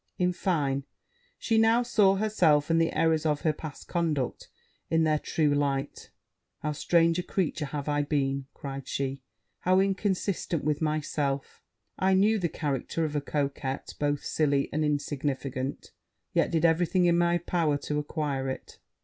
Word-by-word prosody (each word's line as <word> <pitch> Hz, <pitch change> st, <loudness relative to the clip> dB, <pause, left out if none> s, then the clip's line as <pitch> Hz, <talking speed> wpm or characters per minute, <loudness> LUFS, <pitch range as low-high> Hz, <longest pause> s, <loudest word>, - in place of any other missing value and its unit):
In 180 Hz, 0 st, +1 dB
fine, 145 Hz, -7 st, 0 dB, 0.5 s
she 225 Hz, -1 st, +1 dB
now 225 Hz, +2 st, +4 dB
saw 210 Hz, -6 st, +4 dB
herself, 170 Hz, -8 st, +2 dB
and 165 Hz, 0 st, +4 dB
the 165 Hz, -, +2 dB
errors 160 Hz, -1 st, +2 dB
of 150 Hz, -2 st, 0 dB
her 155 Hz, -, +2 dB
past 150 Hz, -1 st, -9 dB
conduct, 160 Hz, -7 st, -1 dB, 0.4 s
in 165 Hz, 0 st, +3 dB
their 155 Hz, -1 st, +2 dB
true 150 Hz, -2 st, +1 dB
light. 140 Hz, -1 st, -1 dB, 0.5 s
'How 150 Hz, -, 0 dB
strange 165 Hz, +3 st, +2 dB
a -, -, +1 dB
creature 165 Hz, -5 st, -2 dB
have 145 Hz, 0 st, -5 dB
I 145 Hz, 0 st, +1 dB
been!' 140 Hz, -2 st, -1 dB
cried 135 Hz, -1 st, -7 dB
she; 135 Hz, 0 st, -3 dB, 0.4 s
'how 185 Hz, +1 st, +3 dB
inconsiderate 190 Hz, -4 st, 0 dB
with 150 Hz, +1 st, 0 dB
myself! 145 Hz, -3 st, -2 dB, 0.4 s
I 190 Hz, 0 st, +3 dB
knew 210 Hz, +3 st, +4 dB
the 175 Hz, -3 st, 0 dB
character 150 Hz, +2 st, -2 dB
of 150 Hz, -1 st, -4 dB
a 145 Hz, -, +1 dB
coquette 140 Hz, -1 st, -3 dB
both 145 Hz, -1 st, 0 dB
silly 140 Hz, -3 st, +1 dB
and 155 Hz, +1 st, +1 dB
insignificant; 140 Hz, -2 st, -2 dB, 0.4 s
yet -, -, +2 dB
did 165 Hz, 0 st, +1 dB
every 165 Hz, +1 st, +3 dB
thing 185 Hz, 0 st, +2 dB
in 170 Hz, -1 st, +4 dB
my 175 Hz, 0 st, +3 dB
power 165 Hz, -3 st, 0 dB
to 150 Hz, +1 st, -2 dB
acquire 145 Hz, -3 st, -2 dB
it. 130 Hz, -, -7 dB
155 Hz, 160 wpm, -28 LUFS, 145-175 Hz, 0.5 s, now